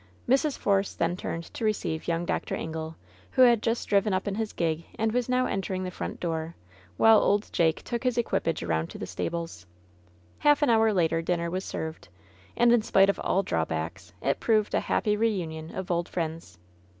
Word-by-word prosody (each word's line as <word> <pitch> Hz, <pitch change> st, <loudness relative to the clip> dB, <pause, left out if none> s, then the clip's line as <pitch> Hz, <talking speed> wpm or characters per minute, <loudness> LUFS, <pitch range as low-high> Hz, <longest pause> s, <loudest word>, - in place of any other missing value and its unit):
Mrs. 275 Hz, +3 st, +2 dB
Force 200 Hz, -1 st, +1 dB
then 170 Hz, +1 st, 0 dB
turned 170 Hz, -2 st, -4 dB
to -, -, -6 dB
receive 185 Hz, -7 st, -1 dB
young 170 Hz, 0 st, 0 dB
Dr. -, -, -2 dB
Ingle, 160 Hz, 0 st, -5 dB, 0.4 s
who 260 Hz, -, +6 dB
had 240 Hz, -3 st, +5 dB
just 230 Hz, +1 st, -1 dB
driven 200 Hz, 0 st, +2 dB
up 185 Hz, -, -2 dB
in 200 Hz, -, -1 dB
his 220 Hz, +1 st, -2 dB
gig 165 Hz, -1 st, -1 dB
and 220 Hz, 0 st, +1 dB
was 245 Hz, +1 st, -1 dB
now 255 Hz, 0 st, +2 dB
entering 190 Hz, -1 st, -2 dB
the 185 Hz, -, -4 dB
front -, -, -5 dB
door, 165 Hz, -1 st, -3 dB, 0.4 s
while 225 Hz, -1 st, +7 dB
old 205 Hz, +1 st, +1 dB
Jake 160 Hz, -2 st, +2 dB
took 235 Hz, -1 st, -3 dB
his 250 Hz, -2 st, 0 dB
equipage 195 Hz, -8 st, 0 dB
around 80 Hz, -1 st, -1 dB
to -, -, -9 dB
the -, -, -5 dB
stables. 165 Hz, -, -5 dB, 0.7 s
Half 295 Hz, 0 st, +4 dB
an 285 Hz, -, +4 dB
hour 225 Hz, -1 st, +4 dB
later 165 Hz, -4 st, +1 dB
dinner 170 Hz, 0 st, -1 dB
was 185 Hz, +1 st, -2 dB
served. 160 Hz, 0 st, -5 dB, 0.5 s
And, 240 Hz, 0 st, +5 dB
in 240 Hz, -, +4 dB
spite 195 Hz, -2 st, +4 dB
of -, -, -11 dB
all 195 Hz, -, +1 dB
drawbacks, 80 Hz, -, -3 dB
it 140 Hz, -, +1 dB
proved 215 Hz, -2 st, +2 dB
a -, -, +3 dB
happy 210 Hz, -2 st, 0 dB
reunion 175 Hz, -8 st, -1 dB
of 190 Hz, 0 st, -4 dB
old 170 Hz, 0 st, -1 dB
friends. 160 Hz, -, -4 dB
185 Hz, 195 wpm, -27 LUFS, 160-220 Hz, 0.7 s, while